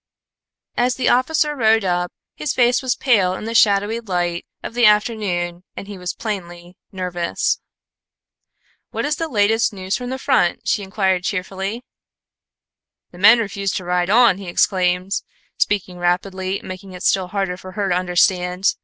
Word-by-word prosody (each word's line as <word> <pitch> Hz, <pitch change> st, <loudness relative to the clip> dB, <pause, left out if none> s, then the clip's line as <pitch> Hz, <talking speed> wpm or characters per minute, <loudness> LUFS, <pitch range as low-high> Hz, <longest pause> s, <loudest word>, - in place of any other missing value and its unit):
As 245 Hz, 0 st, +2 dB
the 255 Hz, -, +1 dB
officer 300 Hz, +4 st, +2 dB
rode 225 Hz, -4 st, +3 dB
up, 175 Hz, -1 st, 0 dB, 0.2 s
his 300 Hz, -, -3 dB
face 245 Hz, 0 st, +3 dB
was 255 Hz, -1 st, 0 dB
pale 200 Hz, -8 st, +2 dB
in 215 Hz, -, -7 dB
the 230 Hz, -, -4 dB
shadowy 210 Hz, 0 st, +3 dB
light 175 Hz, -5 st, -2 dB, 0.2 s
of -, -, -6 dB
the 240 Hz, -1 st, +5 dB
afternoon 200 Hz, -5 st, 0 dB
and 195 Hz, -, -7 dB
he 205 Hz, -, -7 dB
was 180 Hz, 0 st, -4 dB
plainly 175 Hz, -4 st, -6 dB, 0.2 s
nervous. 180 Hz, -3 st, -2 dB, 1.3 s
"What -, -, -3 dB
is 300 Hz, +1 st, -1 dB
the 330 Hz, -, -2 dB
latest 225 Hz, -3 st, +2 dB
news 190 Hz, -1 st, -3 dB
from 245 Hz, -1 st, -5 dB
the 260 Hz, -, -3 dB
front?" 260 Hz, -10 st, +1 dB
she 210 Hz, -, +1 dB
inquired 190 Hz, -2 st, 0 dB
cheerfully. 195 Hz, +4 st, -3 dB, 1.3 s
"The 175 Hz, -, -14 dB
men 220 Hz, +5 st, +8 dB
refuse 200 Hz, -3 st, -2 dB
to 185 Hz, -, -4 dB
ride 180 Hz, 0 st, 0 dB
on," 220 Hz, -3 st, +5 dB
he 195 Hz, -, -8 dB
exclaimed, 180 Hz, +1 st, +1 dB, 0.4 s
speaking 185 Hz, -3 st, -1 dB
rapidly, 185 Hz, +2 st, -1 dB
making 185 Hz, 0 st, -8 dB
it 180 Hz, -, -8 dB
still 190 Hz, -2 st, +2 dB
harder 195 Hz, -1 st, -2 dB
for 185 Hz, 0 st, -11 dB
her 200 Hz, 0 st, -1 dB
to 175 Hz, -, +2 dB
understand. 180 Hz, +1 st, +2 dB
195 Hz, 160 wpm, -20 LUFS, 180-225 Hz, 1.3 s, men